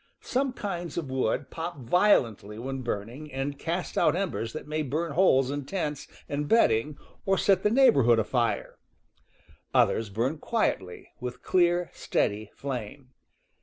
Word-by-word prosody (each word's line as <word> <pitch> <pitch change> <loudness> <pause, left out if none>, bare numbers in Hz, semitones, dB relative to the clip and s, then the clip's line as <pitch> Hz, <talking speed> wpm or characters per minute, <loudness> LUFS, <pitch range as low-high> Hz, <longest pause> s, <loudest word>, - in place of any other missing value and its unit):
Some 265 0 0
kinds 175 -7 -5
of 150 -6 -3
wood 130 +1 -1
pop 170 0 -5
violently 120 - +2
when 135 +3 -4
burn 105 -4 -3
ing 145 +6 -10
and 140 +1 -3
cast 170 +4 -2
out 155 - +3
embers 175 - -2
that 155 - -7
may 155 +1 -1
burn 155 +4 -2
holes 135 -6 +4
in 145 0 -3
tents 150 -5 -3 0.2
and 145 +1 -3
bedding 145 - +3 0.3
or 195 0 +2
set 190 -1 +3
the 210 - +3
neighborhood 140 - +5
afire; 115 +2 -1 1.0
others 110 -2 +3
burn 120 +9 -1
quietly, 95 - -2
with 125 -1 -6
clear, 175 -1 +2
steady 105 +1 -1
flame. 130 0 -6
145 Hz, 145 wpm, -27 LUFS, 120-175 Hz, 1.0 s, neighborhood